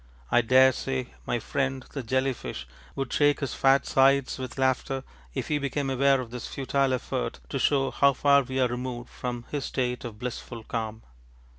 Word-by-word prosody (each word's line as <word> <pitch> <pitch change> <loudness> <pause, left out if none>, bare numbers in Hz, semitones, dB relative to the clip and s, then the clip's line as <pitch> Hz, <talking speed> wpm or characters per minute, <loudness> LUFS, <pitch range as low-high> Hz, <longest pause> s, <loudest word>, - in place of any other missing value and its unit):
I 120 - +5
daresay 130 +1 +3
my 120 - +1
friend 135 +3 -2
the 140 - -4
jelly 130 +3 +1
fish 60 - -7 0.3
would 135 -2 -3
shake 145 -1 +3
his 140 - -2
fat 135 0 +4
sides 135 0 +3
with 130 0 -6
laughter 130 0 0 0.3
if - - -2
he 150 -1 +1
became 140 -1 -2
aware 135 +1 +4
of 120 -3 -6
this 125 -2 -5
futile 135 0 0
effort 120 - -3
to - - -2
show 135 -2 +2
how 140 0 +4
far 140 +1 +5
we 130 0 -3
are 130 - +4
removed 120 0 -5
from 120 -1 -5
his 145 -2 -2
state 125 -2 -2
of 115 -3 -7
blissful 120 -1 -6
calm. 110 -1 -4
130 Hz, 180 wpm, -27 LUFS, 125-135 Hz, 0.3 s, I